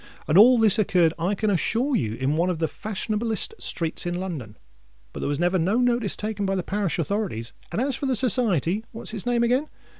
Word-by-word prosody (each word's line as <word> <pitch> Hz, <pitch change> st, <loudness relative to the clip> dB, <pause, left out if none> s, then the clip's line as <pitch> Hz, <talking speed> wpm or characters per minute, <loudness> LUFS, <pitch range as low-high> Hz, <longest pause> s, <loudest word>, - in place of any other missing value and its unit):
And 150 Hz, -, +1 dB
all 240 Hz, +6 st, +8 dB
this 220 Hz, -2 st, +5 dB
occurred, 175 Hz, -5 st, +3 dB
I 180 Hz, +5 st, 0 dB
can 210 Hz, +1 st, 0 dB
assure 235 Hz, -, 0 dB
you, 110 Hz, -, -1 dB
in 135 Hz, +4 st, -1 dB
one 170 Hz, +3 st, +1 dB
of 180 Hz, -, -1 dB
the 160 Hz, 0 st, 0 dB
fashion 215 Hz, +3 st, -5 dB
ablest 225 Hz, -, -1 dB
streets 165 Hz, 0 st, -2 dB
in 175 Hz, 0 st, -2 dB
London. 145 Hz, -, -6 dB, 0.6 s
But -, -, -7 dB
there -, -, -2 dB
was 145 Hz, -, -1 dB
never 175 Hz, +3 st, +1 dB
no 190 Hz, +7 st, +1 dB
notice 245 Hz, -4 st, +1 dB
taken 210 Hz, -1 st, -4 dB
by 195 Hz, 0 st, 0 dB
the 185 Hz, -, -2 dB
parish 195 Hz, -3 st, -2 dB
authorities; 170 Hz, -, -3 dB, 0.2 s
and -, -, -2 dB
as 265 Hz, +1 st, 0 dB
for 280 Hz, -, -3 dB
the 260 Hz, -, +1 dB
Society—what's 220 Hz, -, +1 dB
its 220 Hz, +1 st, -4 dB
name 240 Hz, -1 st, +2 dB
again? 255 Hz, +6 st, +1 dB
200 Hz, 215 wpm, -24 LUFS, 170-230 Hz, 0.6 s, all